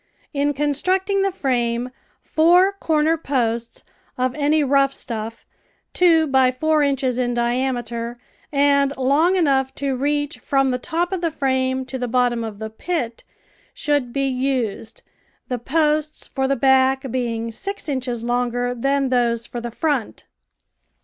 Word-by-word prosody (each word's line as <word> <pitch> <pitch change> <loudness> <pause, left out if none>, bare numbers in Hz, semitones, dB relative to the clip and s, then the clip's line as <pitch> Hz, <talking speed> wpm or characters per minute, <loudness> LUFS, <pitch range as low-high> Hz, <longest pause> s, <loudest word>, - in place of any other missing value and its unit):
In 290 0 +1
constructing 370 +8 +1
the 390 - +2
frame, 245 -6 -1 0.3
four 355 +4 +4
corner 320 -4 +1
posts, 235 -5 -2 0.3
of 255 0 0
any 300 +1 +2
rough 275 0 +3
stuff, 225 -3 -6 0.5
two 330 -3 +4
by 265 -3 +3
four 310 +4 +1
inches 270 -3 0
in 245 -1 0
diameter 240 -1 -1 0.3
and 280 -1 +2
long 290 +8 +3
enough 270 -7 +1
to 275 -1 -1
reach 290 +3 -1
from 270 -1 +1
the 250 -1 -1
top 345 +6 -2
of 375 -2 -2
the 335 - +1
frame 260 -3 0
to 260 0 -5
the 245 - -2
bottom 240 -1 +1
of 220 -2 -6
the 220 +1 -6
pit, 240 -2 -3 0.5
should 290 -5 0
be 275 +2 0
used, 250 -4 -2 0.5
the 250 -1 -2
posts 305 +3 0
for 265 -1 -2
the 275 - +1
back 265 0 +3
being 230 -2 -2
six 395 - -5
inches 255 -4 -2
longer 245 0 0
than 275 +2 0
those 235 -2 +1
for 240 0 -6
the 240 - -4
front. 270 0 -2
265 Hz, 145 wpm, -21 LUFS, 245-295 Hz, 0.5 s, four